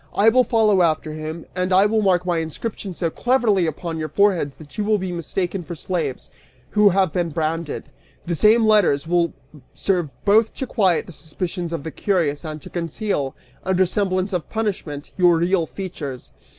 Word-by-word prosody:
I 210 +3 +6
will 255 +3 +4
follow 215 -4 +3
after 155 -2 +1
him, 155 +1 -6
and 185 0 -1
I 190 +2 +6
will 215 +1 +2
mark 180 -3 +2
my 175 -2 +1
inscription 185 +4 -5
so 165 -2 -1
cleverly 225 -8 +2
upon 160 +1 -4
your 155 0 -3
foreheads 185 -9 +2
that 150 -2 -14
you 210 - -1
will 215 0 +2
be 190 -2 -4
mistaken 175 +2 -3
for 170 0 -7
slaves 160 -5 -3 0.4
who 210 -1 +5
have 190 -4 +2
been 175 -2 0
branded! 160 0 -2 0.4
The 170 - -2
same 215 +7 +4
letters 205 -10 +4
will 170 -1 +2 0.4
serve 180 -6 0 0.2
both 215 +2 +4
to 265 - -3
quiet 190 -9 +2
the - - -11
suspicions 170 +3 -5
of 165 -4 -4
the 160 - -5
curious 160 -4 0
and 155 -1 -5
to - - -10
conceal, 165 -4 -2 0.3
under 190 0 +2
semblance 185 +1 -1
of 175 -3 -2
punishment, 190 -10 -3
your 175 -2 +5
real 170 0 +1
features!" 150 -9 -7
180 Hz, 180 wpm, -22 LUFS, 160-200 Hz, 0.4 s, I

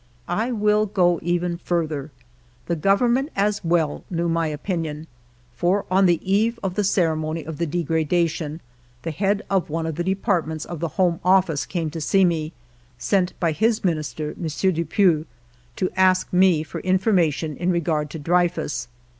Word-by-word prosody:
I 220 +8 -1
will 210 -1 +2
go 175 -3 +2
even 175 0 -1
further. 160 -5 -2 0.6
The 170 - -1
Government, 235 - +2
as 200 0 0
.well, 165 -3 0
knew 170 -1 -1
my 165 -1 +1
opinion, 155 0 -3 0.5
for 180 +9 +1
on 190 +1 +5
the 175 -1 +3
eve 215 +5 +2
of 190 -2 -1
the 210 +2 0
ceremony 160 -4 0
of 160 0 -7
the 170 - 0
degradation, 160 0 -1 0.4
the 165 - -3
head 200 +6 0
of 190 -4 0
one 165 +1 -2
of 160 -1 -4
the 175 - -1
departments 180 -5 -1
of 175 - -7
the 170 - -1
Home 175 -3 +2
Office 180 -7 +2
came 165 -4 -2
to 165 +5 +2
me, 160 -3 -1 0.5
sent 185 +6 0
by 170 -2 +1
his 220 +7 +1
Minister, 155 -3 -2
M. 165 - -2 0.3
Dupuy, 170 -1 +2 0.5
to 185 - -1
ask 185 -1 +3
me 180 -4 +4
for 155 - -7
information 180 -5 +1
in 175 +4 -1
regard 160 -4 0
to 160 - -6
Drevfus. 170 -2 0
175 Hz, 160 wpm, -23 LUFS, 160-190 Hz, 0.6 s, on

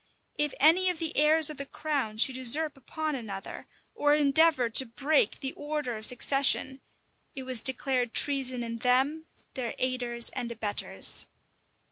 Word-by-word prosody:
If 295 -2 -2
any 340 +6 +4
of 360 - -3
the 325 -1 -5
heirs 305 +1 +4
of 300 - -10
the 280 - -6
crown 275 -10 -4
should 255 +3 +2
usurp 285 +5 0
upon 310 +3 -5
another, 205 -7 -8 0.3
or 295 -9 +1
endeavor 295 -2 +3
to 230 +3 +3
break 295 - 0
the 270 -1 -4
order 290 -5 -5
of 215 0 +5
succession, 265 +1 +1 0.5
it 265 - -6
was 255 -3 +2
declared 255 -2 -1
treason 260 -4 +2
in 230 0 -6
them, 270 +7 0 0.3
their 245 -3 -5
aiders 245 -2 0
and 245 -2 -6
abettors. 215 -3 0
265 Hz, 150 wpm, -27 LUFS, 245-300 Hz, 0.5 s, of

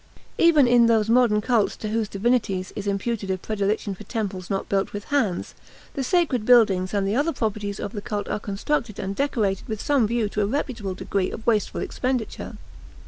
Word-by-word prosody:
Even 310 -6 +6
in 240 -1 +5
those 225 -1 +3
modern 235 -3 +4
cults 230 -2 +1
to 215 - -5
whose 220 -1 -1
divinities 200 -3 0
is 205 -1 -5
imputed 200 +1 -2
a 190 - 0
predilection 205 +1 -2
for 185 - -10
temples 200 -6 -4
not 195 -1 -2
built 195 -1 0
with 205 0 -5
hands, 220 -11 0 0.4
the 275 - -2
sacred 290 - +1
buildings 205 -6 +4
and 200 -1 0
the 205 - 0
other 295 +6 +2
properties 210 -6 -3
of 200 - -4
the 210 - -5
cult 210 -2 -4
are - - -2
constructed 215 +3 -2
and 195 +1 -4
decorated 215 -8 -1
with 220 -2 -4
some 270 -4 +2
view 230 -1 0
to 210 +1 -2
a 200 - +1
reputable 225 -6 -3
degree 190 0 -1
of 220 - -8
wasteful 215 -3 +1
expenditure. 255 -3 -3
215 Hz, 195 wpm, -24 LUFS, 200-240 Hz, 0.4 s, Even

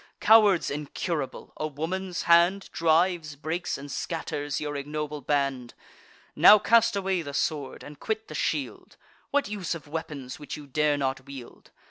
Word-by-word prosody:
Cowards 210 -7 +5
incurable, 150 0 -4
a 155 - -2
woman's 175 +5 -4
hand 170 +3 +4
Drives, 165 -1 +1
breaks, 160 +5 -3
and 140 +1 -9
scatters 145 -3 -3
your 145 -1 -4
ignoble 150 +1 -4
band! 135 -3 -1 0.6
Now 210 - +9
cast 230 +1 +3
away 190 -2 0
the 145 -3 -7
sword, 145 -4 -2
and 145 0 -11
quit 435 0 -3
the - - -9
shield! - - -3 0.3
What 285 -1 +1
use 200 -5 -3
of 160 - -10
weapons 145 -4 -6
which 145 -1 -7
you 150 - -10
dare 150 +1 +1
not 135 -1 -2
wield? 135 -3 -11
155 Hz, 150 wpm, -27 LUFS, 145-180 Hz, 0.6 s, Now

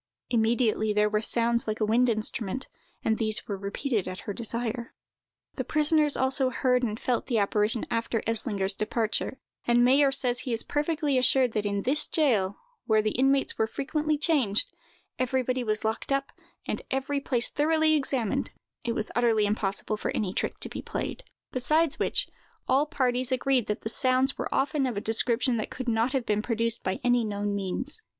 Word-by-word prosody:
Immediately 225 -2 +2
there 210 0 +2
were 210 0 +1
sounds 235 +1 0
like 215 0 -2
a 215 - +2
wind 240 +3 +3
instrument, 220 +2 -1 0.4
and 220 -1 +1
these 215 -1 -1
were 205 - -2
repeated 200 +2 -2
at 185 0 -6
her 205 - -5
desire. 235 +2 -3 0.6
The - - -1
prisoners 305 -1 +3
also 260 0 +3
heard 250 0 +1
and 220 -2 -2
felt 245 -2 -1
the 240 - 0
apparition 210 +2 +2
after 230 -1 -1
Eslinger's 210 -4 0
departure; 220 +4 -2 0.3
and 240 0 +4
Mayer 275 +2 +5
says 250 -3 +1
he 250 - -3
is 230 - 0
perfectly 295 -2 0
assured 255 -1 +4
that 210 -1 -1
in 200 0 -1
this 290 +4 +2
jail, 215 - +1 0.3
where 215 -1 +3
the 215 - 0
inmates 270 +3 +1
were 220 - +2
frequently 300 +5 -1
changed, 280 - +2 0.5
everybody 255 0 0
was 215 -1 -1
locked 220 +5 -2
up, 275 0 0 0.3
and - - -3
every 270 +2 -1
place 245 -3 +1
thoroughly 315 +1 +3
examined, 265 -7 0 0.3
it 235 - -1
was 215 - -3
utterly 225 -3 +3
impossible 205 0 -1
for - - -3
any 190 -3 -1
trick - - -2
to - - -1
be - - -6
played: - - -4 0.3
besides 305 +5 +2
which, - - 0 0.4
all 280 +3 +3
parties 255 -4 0
agreed 255 -2 +1
that 210 - -2
the - - -4
sounds 255 +3 +1
were - - -4
often 275 0 +1
of 240 -5 -3
a - - +1
description 235 +3 +1
that 215 - -3
could 255 -1 -6
not 230 +2 +1
have 260 -3 -1
been 210 0 +1
produced 230 0 0
by 185 0 -2
any 245 -1 +3
known 205 -1 -2
means. 200 - -3
240 Hz, 180 wpm, -27 LUFS, 215-270 Hz, 0.6 s, Mayer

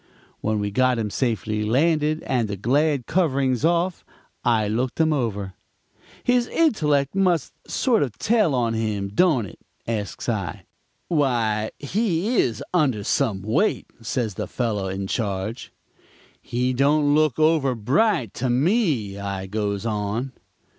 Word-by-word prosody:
"When 110 0 -1
we 100 0 -2
got 130 +3 +2
him 110 -2 -2
safely 110 -3 -1
landed 155 +6 +1
and 125 -4 0
the 100 -1 -4
glad 140 - +1
coverings 135 -7 +1
off, 170 +2 +1 0.4
I 115 -3 +2
looked 120 +7 -2
him 160 -1 +3
over. 105 -8 -2 0.7
"'His 245 -1 +2
intellect 150 - +2
must 180 -8 +1 0.2
sort 240 -5 +2
of 120 -7 -2
tell 210 - +2
on 120 -2 +1
him, 105 -3 -2
don't 135 - +2
it?' 95 - -12 0.3
asks 105 -3 -3
I. 100 -10 -3 0.4
"'Why, 115 -8 +1
he 205 - 0
is 115 -3 +1
some - - -12 0.2
under 125 -9 0 0.4
weight,' 200 - +1
says 115 -1 -2
the - - -4
fellow 110 -6 -2
in 95 +1 -3
charge. 100 +2 -3 0.7
"'He 125 +2 -1
don't 145 +3 +3
look 155 -3 +2
over 155 -4 +3
bright 130 - +1
to 125 +1 -2
me,' 135 - +1
I 100 -1 -4
goes 100 +1 -2
on. 110 +4 -2
125 Hz, 140 wpm, -23 LUFS, 105-155 Hz, 0.7 s, him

